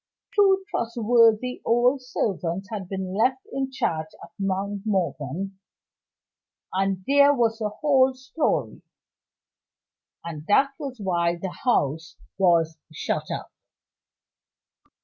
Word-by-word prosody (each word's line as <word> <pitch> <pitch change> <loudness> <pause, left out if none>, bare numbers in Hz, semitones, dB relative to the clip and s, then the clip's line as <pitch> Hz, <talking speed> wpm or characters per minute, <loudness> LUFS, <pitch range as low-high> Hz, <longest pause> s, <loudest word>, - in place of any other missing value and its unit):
Two 390 -2 +4
trustworthy 230 +1 +2
old 245 +3 +3
servants 195 -6 -2
had 195 -4 -5
been 190 -1 -4
left 255 +6 +1
in 270 0 -1
charge 160 -11 -2 0.2
at - - -12
Mount 195 +1 -2
Morven 190 - -2 1.1
and 195 0 0
there 285 +1 +5
was 230 -2 +1
the 215 -2 -1
whole 265 +2 +3
story; 265 +5 -2 1.4
and 155 -3 -6
that 275 +7 +4
was 270 -5 -6
why 175 -3 +1
the 180 +2 -5
house 160 - +1 0.2
was 165 -4 +3
shut 155 - -3
up. - - -5
210 Hz, 110 wpm, -25 LUFS, 185-255 Hz, 1.4 s, there